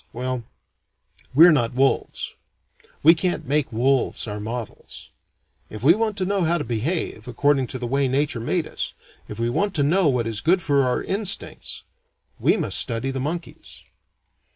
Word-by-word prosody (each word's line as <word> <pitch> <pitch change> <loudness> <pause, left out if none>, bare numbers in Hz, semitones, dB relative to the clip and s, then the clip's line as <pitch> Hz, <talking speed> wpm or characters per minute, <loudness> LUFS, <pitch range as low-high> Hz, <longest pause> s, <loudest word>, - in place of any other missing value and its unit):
Well 125 0 -3 0.9
we're 170 +4 +9
not 120 -6 +1
wolves. 135 +1 0 0.7
We 160 +3 +9
can't 175 +2 -2
make 145 0 0
wolves 130 +3 +1
our 105 0 -4
models. 115 +2 -7 0.6
If 110 +1 -9
we 155 +5 +7
want 215 0 -1
to 185 - 0
know 200 0 0
how 170 +1 +2
to 150 - -3
behave, 120 -1 -3
according 135 +1 +1
to 130 - -5
the 125 - -5
way 135 +3 +1
nature 135 -1 0
made 160 +8 -1
us, - - -5 0.3
if 105 - -8
we 115 +1 0
want 200 +8 0
to 145 - +2
know 170 +4 +3
what 125 -4 +1
is 115 -2 -2
good 180 +4 +3
for 140 -2 +3
our 125 -2 0
instincts, 200 0 -3 0.6
we - - +3
must - - 0
study 115 +3 -1
the 135 - -4
monkeys." 165 +6 -6
140 Hz, 170 wpm, -23 LUFS, 120-165 Hz, 0.9 s, we're